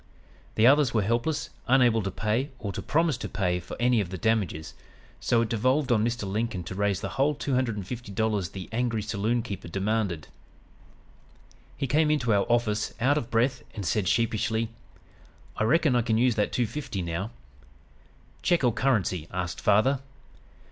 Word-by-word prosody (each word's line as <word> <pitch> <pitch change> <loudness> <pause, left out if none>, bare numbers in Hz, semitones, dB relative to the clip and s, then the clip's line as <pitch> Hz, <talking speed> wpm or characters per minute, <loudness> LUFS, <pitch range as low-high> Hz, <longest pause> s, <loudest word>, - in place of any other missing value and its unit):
The 110 - +4
others 140 -1 +5
were 110 - +3
helpless, 120 +9 -1 0.2
unable 125 -3 +4
to 100 - -2
pay 110 +8 -1
or 100 -4 -4
to - - -4
promise 160 -3 +1
to - - -5
pay 90 -2 0
for 90 - -9
any 120 -2 +3
of 90 - -4
the 95 - -5
damages, 100 -8 -1 0.5
so 115 - +2
it 115 - -4
devolved 130 +5 +1
on 110 -3 +3
Mr. 120 -2 -1
Lincoln 105 -2 -2
to 90 - -7
raise 100 0 0
the - - -3
whole 145 +3 +1
two 140 - -3
hundred 125 -3 +1
and 100 -3 -5
fifty 120 +1 -7
dollars 105 -3 0
the 95 -2 -7
angry 115 -2 -1
saloon 110 +2 0
keeper 100 -6 -6
demanded. 95 -3 -1 1.5
"He - - -1
came 150 +4 +2
into 130 -7 +2
our 100 -1 +2
office 110 -3 +1
out 135 +5 +3
of 120 - -7
breath 125 +2 +1
and 100 -3 -4
said 105 -1 0
sheepishly: 110 +1 +1 0.9
"'I 110 - +1
reckon 150 +1 +3
I 120 - +4
can 110 -1 +1
use 125 +1 +3
that 105 -1 0
two 120 - +1
fifty 130 -6 -4
now.' 85 +5 -3 1.1
"'Check 175 -5 +2
or 120 -3 +3
currency?' 100 - 0
asked 90 -1 -3
father. 110 +7 +3
115 Hz, 180 wpm, -27 LUFS, 100-125 Hz, 1.5 s, others